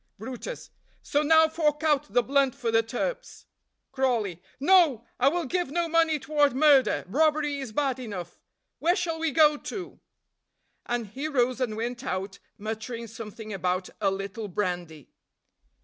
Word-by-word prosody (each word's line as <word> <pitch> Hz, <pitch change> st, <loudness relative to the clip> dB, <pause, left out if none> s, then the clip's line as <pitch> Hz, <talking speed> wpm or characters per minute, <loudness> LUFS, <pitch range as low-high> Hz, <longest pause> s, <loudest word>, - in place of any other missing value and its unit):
brutus. 255 Hz, -, -7 dB, 0.3 s
"So 290 Hz, -, +1 dB
now 320 Hz, +1 st, +6 dB
fork 310 Hz, -1 st, 0 dB
out 300 Hz, -4 st, +1 dB
the 245 Hz, -, +3 dB
blunt 275 Hz, 0 st, +2 dB
for 245 Hz, -4 st, -2 dB
the 225 Hz, 0 st, +4 dB
turps." 365 Hz, -, -4 dB, 0.5 s
Crawley. 235 Hz, -, 0 dB, 0.2 s
"No! 295 Hz, -, +4 dB
I 255 Hz, -, +4 dB
will 340 Hz, +4 st, +1 dB
give 355 Hz, +2 st, -1 dB
no 340 Hz, +3 st, 0 dB
money 325 Hz, -1 st, +3 dB
toward 290 Hz, -2 st, +1 dB
murder 280 Hz, -2 st, +4 dB
robbery 295 Hz, +4 st, +1 dB
is 265 Hz, -5 st, -6 dB
bad 270 Hz, +2 st, 0 dB
enough. 200 Hz, -8 st, -7 dB, 0.4 s
Where 345 Hz, +3 st, +3 dB
shall 335 Hz, -4 st, -2 dB
we 325 Hz, 0 st, +1 dB
go 300 Hz, +1 st, +5 dB
to?" 365 Hz, +3 st, -7 dB, 0.9 s
And 240 Hz, -1 st, -1 dB
he 265 Hz, +9 st, -5 dB
rose 255 Hz, -3 st, +1 dB
and 220 Hz, -4 st, -1 dB
went 240 Hz, +2 st, -4 dB
out, 190 Hz, -4 st, -4 dB, 0.2 s
muttering 220 Hz, +2 st, -5 dB
something 220 Hz, -1 st, -8 dB
about 185 Hz, -1 st, -2 dB
"a 200 Hz, -, +3 dB
little 195 Hz, +3 st, -4 dB
brandy." 175 Hz, -6 st, -4 dB
260 Hz, 150 wpm, -27 LUFS, 220-305 Hz, 0.9 s, now